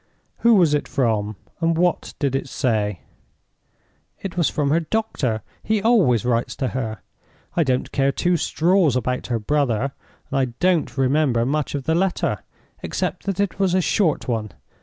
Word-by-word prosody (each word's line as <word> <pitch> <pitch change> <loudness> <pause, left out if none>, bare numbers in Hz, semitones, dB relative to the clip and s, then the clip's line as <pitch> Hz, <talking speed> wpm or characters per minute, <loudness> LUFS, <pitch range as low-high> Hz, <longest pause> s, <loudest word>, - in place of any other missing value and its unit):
"Who 235 -1 +5
was 170 -6 +4
it 145 - 0
from? 110 -5 0 0.2
and 165 -1 +1
what 175 0 0
did 140 -2 0
it 135 0 -2
say?" 105 - -1 1.2
"It 190 -4 -6
was 170 -3 +2
from 145 -2 0
the 160 +4 +3
doctor—he 195 - -2
always 180 - +4
writes 120 -1 0
to 130 - -1
her. 110 -4 -4 0.5
I 170 - +3
don't 130 -3 -1
care 135 0 +2
two 175 +5 +1
straws 170 -2 +2
about 125 0 -1
her 120 - 0
brother, 135 0 0 0.4
and 135 - +1
I 130 - +3
don't 180 -5 +1
remember 135 -3 +2
much 145 +2 -1
of 140 - -3
the 160 - +1
letter, 185 +2 0 0.4
except - - -3
that 195 -1 -1
it 200 -2 -1
was 190 -2 +2
a - - +4
short 175 -3 +1
one. 110 -4 -2
145 Hz, 165 wpm, -22 LUFS, 125-175 Hz, 1.2 s, Who